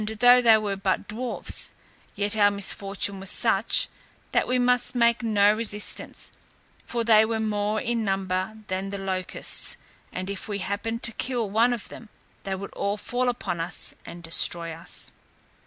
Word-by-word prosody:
though 245 Hz, +2 st, +7 dB
they 225 Hz, -2 st, +7 dB
were 205 Hz, -2 st, -2 dB
but 195 Hz, -1 st, -1 dB
dwarfs, 235 Hz, +4 st, 0 dB, 0.4 s
yet 205 Hz, +1 st, -1 dB
our 205 Hz, -1 st, +5 dB
misfortune 200 Hz, 0 st, 0 dB
was 190 Hz, 0 st, -4 dB
such, 225 Hz, -2 st, +3 dB, 0.4 s
that -, -, +2 dB
we 255 Hz, -, +1 dB
must 250 Hz, 0 st, +2 dB
make 235 Hz, 0 st, +3 dB
no 210 Hz, -3 st, +4 dB
resistance, 215 Hz, -2 st, -2 dB, 0.6 s
for 235 Hz, -1 st, -1 dB
they 220 Hz, -1 st, +6 dB
were 225 Hz, 0 st, -1 dB
more 215 Hz, -1 st, 0 dB
in 235 Hz, +1 st, -1 dB
number 195 Hz, +1 st, -1 dB
than 190 Hz, +1 st, -3 dB
the 200 Hz, -, -4 dB
locusts; 190 Hz, -1 st, -1 dB, 0.3 s
and 185 Hz, +1 st, -5 dB
if 200 Hz, -1 st, -5 dB
we 205 Hz, -2 st, -3 dB
happened 210 Hz, +4 st, -3 dB
to 230 Hz, -, +3 dB
kill 240 Hz, -1 st, -2 dB
one 225 Hz, +5 st, +3 dB
of 240 Hz, -3 st, -4 dB
them, 225 Hz, -, -11 dB, 0.4 s
they 195 Hz, -1 st, -2 dB
would 200 Hz, +1 st, -8 dB
all 200 Hz, +1 st, -1 dB
fall 245 Hz, +3 st, -1 dB
upon 240 Hz, -8 st, -3 dB
us 165 Hz, +1 st, -1 dB
and 170 Hz, 0 st, -10 dB
destroy 165 Hz, 0 st, +2 dB
us. 165 Hz, +1 st, -4 dB
210 Hz, 165 wpm, -25 LUFS, 195-230 Hz, 0.6 s, though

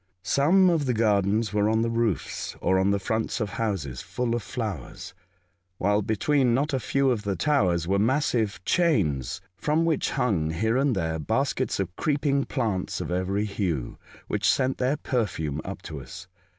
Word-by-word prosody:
Some 175 Hz, -, +4 dB
of 155 Hz, -5 st, 0 dB
the 125 Hz, -, +1 dB
gardens 105 Hz, 0 st, +2 dB
were 105 Hz, 0 st, +2 dB
on 110 Hz, +1 st, +2 dB
the 115 Hz, -, 0 dB
roofs 115 Hz, -4 st, -1 dB
or 95 Hz, +1 st, +2 dB
on 95 Hz, +1 st, +2 dB
the 100 Hz, -, +2 dB
fronts 110 Hz, +5 st, -2 dB
of 105 Hz, -4 st, -2 dB
houses, 90 Hz, -, -3 dB
full 125 Hz, -2 st, -2 dB
of 120 Hz, -, -1 dB
flowers, 105 Hz, -, -5 dB, 0.6 s
while 105 Hz, +3 st, +2 dB
between 120 Hz, +4 st, +2 dB
not 145 Hz, +3 st, 0 dB
a 135 Hz, -, +1 dB
few 135 Hz, +1 st, +1 dB
of 115 Hz, -4 st, -1 dB
the 100 Hz, -2 st, -2 dB
towers 90 Hz, -, +1 dB
were 100 Hz, +1 st, +2 dB
massive 115 Hz, -2 st, +1 dB
chains 100 Hz, -, +1 dB, 0.2 s
from 155 Hz, +2 st, +1 dB
which 160 Hz, -3 st, +1 dB
hung, 100 Hz, -12 st, 0 dB
here 110 Hz, +8 st, 0 dB
and 135 Hz, -2 st, +2 dB
there, 80 Hz, -3 st, -1 dB
baskets 125 Hz, -, -1 dB
of 90 Hz, -2 st, -3 dB
creeping 140 Hz, -2 st, +1 dB
plants 110 Hz, -9 st, -2 dB
of -, -, -4 dB
every 95 Hz, +3 st, 0 dB
hue, 90 Hz, -, -3 dB, 0.3 s
which -, -, +1 dB
sent 130 Hz, 0 st, +1 dB
their 130 Hz, +4 st, +1 dB
perfume 80 Hz, -, -2 dB
up -, -, -7 dB
to 75 Hz, -, -6 dB
us. 90 Hz, +9 st, -10 dB
110 Hz, 175 wpm, -26 LUFS, 95-130 Hz, 0.6 s, Some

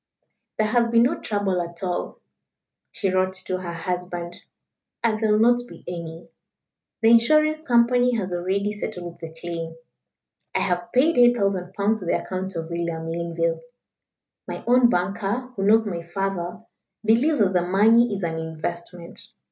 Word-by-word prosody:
"There 215 Hz, -, +2 dB
has 235 Hz, +2 st, +2 dB
been 230 Hz, 0 st, +4 dB
no 250 Hz, -, +1 dB
trouble 200 Hz, -4 st, -1 dB
at 170 Hz, +1 st, -7 dB
all," 180 Hz, -1 st, -3 dB, 0.7 s
she 195 Hz, -3 st, -1 dB
wrote 185 Hz, 0 st, +1 dB
to 185 Hz, 0 st, -2 dB
her 175 Hz, -2 st, -5 dB
husband; 175 Hz, 0 st, -4 dB, 0.7 s
"and 220 Hz, -2 st, +1 dB
there 220 Hz, -1 st, +1 dB
will 210 Hz, -, +4 dB
not 240 Hz, +2 st, +4 dB
be -, -, -13 dB
any. 170 Hz, -2 st, -7 dB, 0.8 s
The 225 Hz, -, +6 dB
insurance 305 Hz, +7 st, +4 dB
company 245 Hz, -2 st, +3 dB
has 190 Hz, -5 st, -2 dB
already 190 Hz, +4 st, -1 dB
settled 180 Hz, -5 st, -6 dB
the 165 Hz, -1 st, -8 dB
claim. 165 Hz, -1 st, -5 dB, 0.8 s
I -, -, +2 dB
have 175 Hz, -1 st, -1 dB
paid 270 Hz, +3 st, +3 dB
8,000 200 Hz, -7 st, +3 dB
pounds 210 Hz, +2 st, +1 dB
to 185 Hz, -, -8 dB
the -, -, +1 dB
account 190 Hz, 0 st, -5 dB
of 165 Hz, 0 st, -5 dB
William 170 Hz, -1 st, -3 dB
Linville. 165 Hz, -1 st, -1 dB, 0.9 s
My -, -, -6 dB
own 245 Hz, 0 st, +5 dB
banker 200 Hz, +6 st, -1 dB
who 195 Hz, -, -4 dB
knows 220 Hz, +1 st, +5 dB
my 175 Hz, -5 st, -3 dB
father 180 Hz, +2 st, -4 dB, 0.4 s
believes 250 Hz, +8 st, +3 dB
that 195 Hz, -4 st, +2 dB
the 180 Hz, -, +3 dB
money 215 Hz, +6 st, +4 dB
is 200 Hz, -2 st, -3 dB
an 165 Hz, -1 st, -2 dB
investment. 170 Hz, +2 st, -5 dB
190 Hz, 155 wpm, -24 LUFS, 175-225 Hz, 0.9 s, The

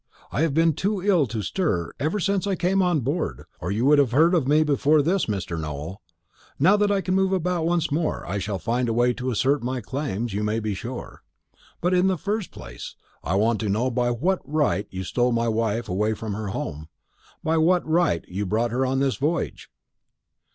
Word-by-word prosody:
I -, -, -1 dB
have 160 Hz, -4 st, +1 dB
been 165 Hz, 0 st, +4 dB
too 200 Hz, +6 st, -1 dB
ill 180 Hz, -9 st, +3 dB
to 110 Hz, -2 st, -4 dB
stir 95 Hz, -, -1 dB
ever 160 Hz, +8 st, 0 dB
since 200 Hz, +1 st, 0 dB
I 195 Hz, -, +1 dB
came 185 Hz, +2 st, +1 dB
on 175 Hz, -5 st, +2 dB
board, 145 Hz, +8 st, -2 dB, 0.2 s
or 90 Hz, -, -3 dB
you 110 Hz, +5 st, 0 dB
would 145 Hz, +1 st, +6 dB
have 130 Hz, -5 st, +2 dB
heard 165 Hz, +6 st, +5 dB
of 160 Hz, -7 st, +2 dB
me 150 Hz, +2 st, +4 dB
before 150 Hz, 0 st, +3 dB
this, 180 Hz, +5 st, +1 dB
Mr. 95 Hz, -5 st, -3 dB
Nowell. 75 Hz, +6 st, -6 dB, 0.6 s
Now 185 Hz, +9 st, +5 dB
that 210 Hz, 0 st, +2 dB
I 200 Hz, -1 st, +2 dB
can 185 Hz, -, -1 dB
move 190 Hz, 0 st, +2 dB
about 180 Hz, -3 st, 0 dB
once 170 Hz, -2 st, 0 dB
more, 155 Hz, +2 st, -1 dB
I 100 Hz, +4 st, -2 dB
shall 100 Hz, 0 st, -3 dB
find 120 Hz, +7 st, -1 dB
a -, -, 0 dB
way 120 Hz, +1 st, +3 dB
to 130 Hz, +1 st, -3 dB
assert 135 Hz, +4 st, +1 dB
my 125 Hz, +2 st, -2 dB
claims, 120 Hz, -5 st, -3 dB
you 100 Hz, -, -1 dB
may 105 Hz, +2 st, 0 dB
be 110 Hz, -2 st, -2 dB
sure. 120 Hz, +6 st, -7 dB, 0.6 s
But 180 Hz, +2 st, +1 dB
in 180 Hz, +1 st, +4 dB
the 190 Hz, -1 st, +1 dB
first 205 Hz, +3 st, -2 dB
place, -, -, -9 dB, 0.3 s
I 90 Hz, -, -1 dB
want 110 Hz, +3 st, +2 dB
to 110 Hz, -, -2 dB
know 115 Hz, +6 st, +1 dB
by 120 Hz, 0 st, +1 dB
what 170 Hz, +11 st, 0 dB
right 140 Hz, -, 0 dB
you 95 Hz, 0 st, -5 dB
stole 120 Hz, +6 st, +1 dB
my 115 Hz, 0 st, +1 dB
wife 115 Hz, 0 st, 0 dB
away 105 Hz, +4 st, 0 dB
from 110 Hz, -1 st, -5 dB
her 105 Hz, +1 st, -4 dB
home 80 Hz, -5 st, -5 dB, 0.6 s
by 160 Hz, +1 st, +1 dB
what 175 Hz, +2 st, +3 dB
right 160 Hz, -, +2 dB
you 100 Hz, +2 st, -3 dB
brought 110 Hz, +4 st, 0 dB
her 125 Hz, +2 st, 0 dB
on 130 Hz, 0 st, 0 dB
this 135 Hz, -2 st, +1 dB
voyage?" 155 Hz, +5 st, -2 dB
130 Hz, 215 wpm, -24 LUFS, 110-170 Hz, 0.6 s, would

